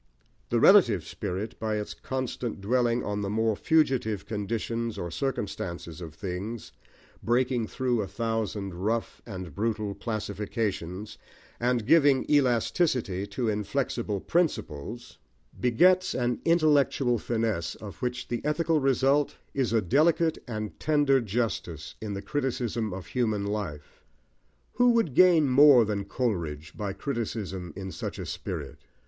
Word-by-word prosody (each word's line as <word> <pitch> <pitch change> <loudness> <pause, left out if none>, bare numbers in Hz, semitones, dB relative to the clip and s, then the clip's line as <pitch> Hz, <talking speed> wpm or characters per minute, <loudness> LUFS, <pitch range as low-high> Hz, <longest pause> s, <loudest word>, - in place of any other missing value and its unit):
The 120 - +2
relative 115 - +6
spirit, 100 +2 -5
by 110 -1 -1
its 105 -1 -3
constant 130 -4 -4
dwelling 120 +3 +1
on 105 0 -2
the 100 - -2
more 110 +1 +1
fugitive 120 -8 +1
conditions 115 +2 -3
or 85 - -4
circumstances 90 - -4
of 80 -3 -8
things, 100 +5 -5 0.5
breaking 120 -1 +1
through 125 -2 0
a 100 - -3
thousand 105 -2 -2
rough 110 +6 -2
and 95 -7 -7
brutal 105 +2 -1
classifications, 105 -3 -4 0.4
and 120 -2 +1
giving 145 -2 +5
elasticity 125 - +2
to 115 +4 -2
inflexible 105 0 -1
principles, 120 - -2 0.4
begets 180 +10 +4
an 120 -1 -1
intellectual 145 -7 +3
finesse 110 -8 -1
of 105 -3 -9
which 125 -1 -3
the 120 - -3
ethical 155 +1 +1
result 135 +1 +2 0.2
is 130 -5 0
a 115 -2 +2
delicate 160 - +3
and 110 -3 -5
tender 145 -3 +3
justice 95 -8 -3
in 105 -2 -4
the 100 - -5
criticism 125 -7 -2
of 90 -1 -6
human 110 -4 -1
life. 95 -9 -5 0.8
Who 245 -1 +5
would 225 - +1
gain 170 -2 +6
more 135 -2 +7
than 100 -2 -2
Coleridge 85 - -3
by 100 -2 -3
criticism 105 - -4
in 95 -1 -6
such - - -5
a - - -5
spirit? - - -5
115 Hz, 130 wpm, -27 LUFS, 100-130 Hz, 0.8 s, more